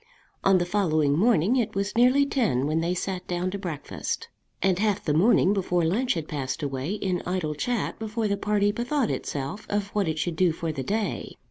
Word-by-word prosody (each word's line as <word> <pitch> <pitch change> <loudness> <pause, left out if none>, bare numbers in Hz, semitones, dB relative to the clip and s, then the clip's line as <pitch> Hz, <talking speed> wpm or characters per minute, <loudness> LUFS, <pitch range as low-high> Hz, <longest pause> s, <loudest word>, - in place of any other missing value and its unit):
On 195 -1 +5
the 175 - +1
following 155 -7 +2
morning 215 - +3
it 225 -4 -1
was 200 +2 -1
nearly 255 +4 +5
ten 210 - +1
when 155 +2 +1
they 175 +2 0
sat 185 0 -3
down 180 +1 -1
to 200 - -4
breakfast, 170 -7 -4 0.3
and 190 -2 +2
half 210 -2 +1
the 150 - +1
morning 190 +3 +4
before 180 -3 +1
lunch 220 +9 +1
had 160 -2 -4
passed 140 0 -3
away 140 +5 -2
in 185 -4 -1
idle 180 -4 -2
chat 230 +9 -2
before 220 0 -2
the 200 - +1
party 205 0 +1
bethought 245 +3 0
itself 145 +10 -4
of 205 -1 -1
what 205 -3 0
it 160 -1 -1
should 160 +1 -2
do 180 -2 +3
for 165 0 -3
the 140 - -4
day. 210 +8 -2
190 Hz, 205 wpm, -26 LUFS, 160-210 Hz, 0.3 s, On